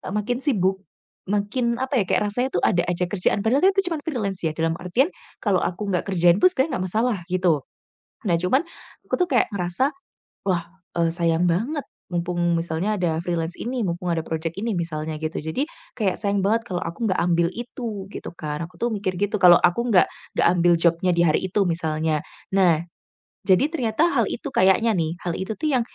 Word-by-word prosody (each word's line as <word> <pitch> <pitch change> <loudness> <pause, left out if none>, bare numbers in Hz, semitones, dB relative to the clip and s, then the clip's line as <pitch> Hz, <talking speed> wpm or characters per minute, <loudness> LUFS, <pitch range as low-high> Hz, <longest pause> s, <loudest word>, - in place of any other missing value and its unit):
e - - -8
makin 235 +4 -1
sibuk 195 - +1 0.5
makin, 235 +4 0
apa 260 -3 +1
ya, - - -4
kayak - - +2
rasanya 250 +5 -1
tuh 175 - -1
ada 175 - +2
aja 180 0 0
kerjaan 200 +3 0
padahal 265 +7 +3
kan 385 - +7
itu 385 - +3
cuman 310 -3 -3
freelance 205 - -3
ya 160 - +1
dalam 165 0 +1
artian 180 - +1 0.3
kalau 200 -4 +1
aku 200 +4 -2
gak 180 - +1
kerjain 175 0 +3
pun 370 - +7
sebenarnya 265 - 0
gak 185 - -1
masalah 225 0 +1
gitu. 175 -6 +2 0.7
Nah, 170 - +3
cuman, 185 - +2 0.4
aku - - -3
tuh 360 - +3
kayak 250 -8 +2
ngerasa, 195 +8 0 0.6
"Wah, 175 -3 0 0.3
eee, 165 - +3
sayang 170 +1 +1
banget 250 - 0 0.3
mumpung 175 0 -1 0.2
misalnya 165 +5 -1
ada 170 -4 0
freelance 170 -1 -2
ini 245 +1 -2
mumpung 175 -2 -1
ada 165 - 0
project 160 +1 -3
ini" 225 -5 -1
misalnya 155 -2 -3
gitu. 155 +1 -3
Jadi 160 - -2 0.3
kayak 200 -6 +1
sayang 200 -2 0
banget 225 +3 +2
kalau 180 -2 -1
aku 210 +6 -2
enggak 190 - +1
ambil 170 -1 +2
itu 230 -3 -6
gitu - - -6
kan, 150 0 -4
aku 165 - -10
tuh 235 -1 -1
mikir 185 -3 -2
gitu 205 +1 -1
kalau 175 -2 +9
aku 175 +7 +2
enggak, 190 -5 +6 0.3
enggak - - +4
ambil 175 -1 +4
job-nya 170 +2 +2
di - - +4
hari 155 - +2
itu 200 +1 +2
misalnya. 160 -2 0 0.3
Nah, 170 -4 +3 0.6
jadi 190 +8 +4
ternyata 255 -2 +1
hal - - +2
itu 290 - -5
kayaknya 190 +3 +4
nih, 165 -2 -1
hal 175 - -1
itu 190 +3 -4
tuh 310 - -1
yang 250 - +3
185 Hz, 200 wpm, -23 LUFS, 170-225 Hz, 0.7 s, kalau